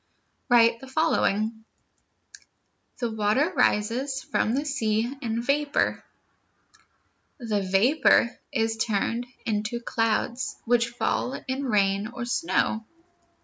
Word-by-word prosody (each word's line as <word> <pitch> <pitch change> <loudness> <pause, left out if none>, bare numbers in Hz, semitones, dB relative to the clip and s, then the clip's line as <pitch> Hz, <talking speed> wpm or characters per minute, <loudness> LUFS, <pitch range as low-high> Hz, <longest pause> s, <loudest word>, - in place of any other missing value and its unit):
Write 230 -1 +5
the 265 - -11
following: 225 -7 0 1.3
The 240 -2 -2
water 220 - +1
rises 255 +6 +1
from 225 - 0
the 285 +2 -1
sea 230 -4 0
in 230 -2 -2
vapor. 285 +3 0 1.3
The 220 -5 -1
vapor 230 +6 +3 0.2
is 225 -4 0
turned 225 +2 -1 0.2
into 215 +2 -1
clouds, 230 +1 -1
which 235 0 +2
fall 240 +1 -1
in 265 +2 -2
rain 200 -3 +1
or 240 0 -6
snow. 220 0 0
235 Hz, 105 wpm, -26 LUFS, 215-260 Hz, 1.3 s, Write